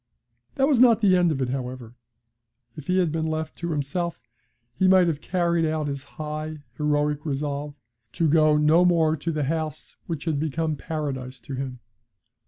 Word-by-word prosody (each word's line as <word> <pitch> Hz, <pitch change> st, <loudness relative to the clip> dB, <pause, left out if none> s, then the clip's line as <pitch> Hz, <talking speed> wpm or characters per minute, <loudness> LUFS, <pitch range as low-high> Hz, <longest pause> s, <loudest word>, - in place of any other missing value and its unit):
That 270 Hz, 0 st, +3 dB
was 280 Hz, -5 st, +3 dB
not 235 Hz, -3 st, +6 dB
the 195 Hz, -3 st, +5 dB
end 175 Hz, -2 st, +3 dB
of 135 Hz, -3 st, -1 dB
it, 125 Hz, -, -2 dB
however. 125 Hz, -2 st, -5 dB, 0.8 s
If 150 Hz, -, -10 dB
he 185 Hz, 0 st, +2 dB
had 175 Hz, -4 st, +2 dB
been 160 Hz, 0 st, -1 dB
left 155 Hz, 0 st, -3 dB
to 170 Hz, -, -3 dB
himself 165 Hz, +3 st, -2 dB, 0.5 s
he 185 Hz, +10 st, +2 dB
might 185 Hz, -1 st, +6 dB
have 155 Hz, -4 st, -1 dB
carried 170 Hz, -2 st, +1 dB
out 155 Hz, -1 st, 0 dB
his 140 Hz, -1 st, -4 dB
high, 155 Hz, +1 st, -6 dB
heroic 150 Hz, 0 st, 0 dB
resolve 145 Hz, 0 st, -3 dB, 0.4 s
to 165 Hz, -, +1 dB
go 155 Hz, 0 st, +4 dB
no 155 Hz, +4 st, +5 dB
more 165 Hz, -3 st, +3 dB
to 165 Hz, +4 st, -3 dB
the 155 Hz, -2 st, -1 dB
house 155 Hz, +2 st, -3 dB
which 165 Hz, -3 st, -4 dB
had 155 Hz, -4 st, 0 dB
become 160 Hz, +1 st, -1 dB
Paradise 135 Hz, -4 st, -4 dB
to 140 Hz, -, -8 dB
him. 130 Hz, -2 st, -5 dB
155 Hz, 180 wpm, -25 LUFS, 145-170 Hz, 0.8 s, not